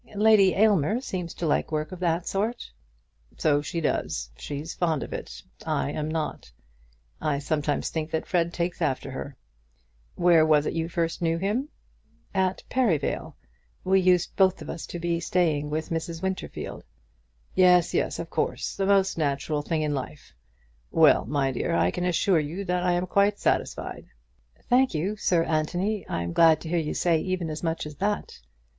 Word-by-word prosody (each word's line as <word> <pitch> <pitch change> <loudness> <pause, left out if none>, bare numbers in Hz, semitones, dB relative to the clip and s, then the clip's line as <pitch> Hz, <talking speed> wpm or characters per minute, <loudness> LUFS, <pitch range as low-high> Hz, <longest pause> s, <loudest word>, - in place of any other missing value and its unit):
"Lady 205 -2 +5
Aylmer 210 0 +3
seems 180 -9 -4
to 175 - -3
like 155 - +1
work 155 0 -2
of 185 - -7
that 170 -1 0
sort." 220 +5 -2 0.7
"So 145 -2 +2
she 165 +4 -4
does. 70 - -2
She's 145 - -6
fond 165 -5 0
of - - -8
it, - - -7 0.2
I 140 - -1
am 150 0 -3
not. 155 - -4 0.7
I 150 -2 0
sometimes 145 0 -1
think 160 -1 -3
that 160 0 -2
Fred 170 -2 +1
takes 170 0 -3
after 135 -3 -1
her. 135 +1 -7 0.8
Where 170 -2 +5
was 155 -2 +4
it - - -1
you 165 0 -2
first 165 0 -2
knew 165 -1 +1
him?" 215 - -1 0.6
"At 190 -1 0
Perivale. 210 - 0 0.5
We 190 +1 +4
used, 180 -1 +2
both 190 -1 +3
of - - -6
us, 165 - -7
to - - -6
be 170 0 -1
staying 160 -4 +1
with 155 +1 -3
Mrs. 165 +1 -4
Winterfield." 190 0 -4 0.7
"Yes, 180 -2 +5
yes; - - 0
of - - -5
course. - - -2
The 195 - -1
most 195 -3 +3
natural 145 0 0
thing 155 +1 -1
in 150 -1 0
life. 140 - -6 0.6
Well, - - +5
my 135 0 +1
dear, 120 - -1
I 85 +1 +3
can 180 - -3
assure 180 0 +2
you 165 +7 -4
that 180 -1 0
I 180 0 +2
am 175 +1 0
quite 200 +3 +2
satisfied." - - -2 0.6
"Thank 255 -5 +3
you, 185 +7 -1
Sir 175 -4 +2
Anthony. 175 +7 -1
I'm 85 0 -2
glad 165 -1 +6
to 160 - -7
hear 175 0 +1
you 155 -2 -3
say 170 -2 +2
even 180 -2 -2
as 155 - -5
much 165 -2 -2
as 150 -1 -9
that." 205 +2 -2
165 Hz, 175 wpm, -26 LUFS, 150-185 Hz, 0.8 s, glad